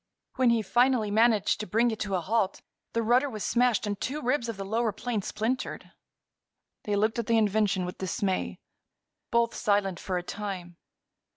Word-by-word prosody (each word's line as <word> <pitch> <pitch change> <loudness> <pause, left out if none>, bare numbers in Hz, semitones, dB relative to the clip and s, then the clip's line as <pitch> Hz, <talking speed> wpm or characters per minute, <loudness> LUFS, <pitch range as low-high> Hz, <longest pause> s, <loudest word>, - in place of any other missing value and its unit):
When 255 -1 +4
he 230 -2 +2
finally 240 +1 +2
managed 215 -2 +3
to 215 - -4
bring 230 +2 +2
it 220 - -5
to 200 -2 -1
a 180 - 0
halt 200 +1 0 0.3
the 230 - 0
rudder 250 +5 +3
was 215 -5 -5
smashed 240 -2 +2
and 205 -1 -3
two 285 +4 -2
ribs 250 -3 0
of 225 - -4
the 195 - -5
lower 225 +2 0
plane 225 +1 -3
splintered. 225 +6 -3 0.9
They 205 - 0
looked 215 +3 +1
at 230 - -3
the 230 -1 +3
invention 205 -3 +2
with 180 - -7
dismay, 185 - -1 0.7
both 235 0 +2
silent 200 -5 0
for 185 -2 -2
a 175 - -3
time. 185 -3 -6
215 Hz, 180 wpm, -28 LUFS, 195-235 Hz, 0.9 s, When